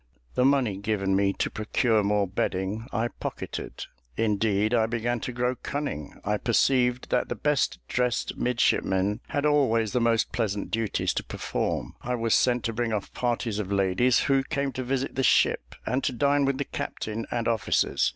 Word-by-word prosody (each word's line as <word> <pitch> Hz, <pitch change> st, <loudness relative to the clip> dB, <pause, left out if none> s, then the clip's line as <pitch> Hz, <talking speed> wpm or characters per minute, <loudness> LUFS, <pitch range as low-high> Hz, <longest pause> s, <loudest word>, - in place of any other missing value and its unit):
The 125 Hz, -, +2 dB
money 130 Hz, -8 st, +2 dB
given 100 Hz, -2 st, 0 dB
me 100 Hz, 0 st, +3 dB
to -, -, -2 dB
procure 110 Hz, +1 st, +1 dB
more 100 Hz, 0 st, +2 dB
bedding, 95 Hz, +4 st, -2 dB
I 115 Hz, +3 st, 0 dB
pocketed: -, -, -6 dB, 0.3 s
indeed 105 Hz, 0 st, +1 dB
I 110 Hz, -2 st, +3 dB
began 120 Hz, +1 st, -1 dB
to 125 Hz, -, -4 dB
grow 125 Hz, +1 st, 0 dB
cunning. 135 Hz, -, -5 dB
I 105 Hz, +1 st, +1 dB
perceived 125 Hz, +2 st, +2 dB
that 125 Hz, -, +1 dB
the -, -, -2 dB
best 150 Hz, -2 st, +1 dB
dressed 125 Hz, -1 st, 0 dB
midshipmen 105 Hz, -4 st, +1 dB
had 145 Hz, -1 st, -1 dB
always 115 Hz, -8 st, +3 dB
the 125 Hz, -, +1 dB
most 115 Hz, -1 st, +2 dB
pleasant 105 Hz, -3 st, -2 dB
duties 115 Hz, -3 st, 0 dB
to -, -, -2 dB
perform. -, -, -3 dB
I 125 Hz, 0 st, -2 dB
was 115 Hz, -1 st, 0 dB
sent 125 Hz, -1 st, +3 dB
to 115 Hz, -, -1 dB
bring 115 Hz, 0 st, -1 dB
off 105 Hz, -3 st, -3 dB
parties 120 Hz, -3 st, -1 dB
of 100 Hz, -2 st, -4 dB
ladies 100 Hz, +6 st, +3 dB
who 135 Hz, -1 st, +3 dB
came 140 Hz, 0 st, -2 dB
to 130 Hz, +1 st, -4 dB
visit 130 Hz, +1 st, -1 dB
the 135 Hz, -, -1 dB
ship, -, -, +2 dB
and 130 Hz, +3 st, 0 dB
to 130 Hz, -, 0 dB
dine 140 Hz, +3 st, +2 dB
with 135 Hz, -1 st, 0 dB
the 140 Hz, -, -2 dB
captain 110 Hz, +1 st, -4 dB
and 115 Hz, -1 st, -1 dB
officers. 110 Hz, -3 st, +2 dB
115 Hz, 180 wpm, -27 LUFS, 105-125 Hz, 0.3 s, me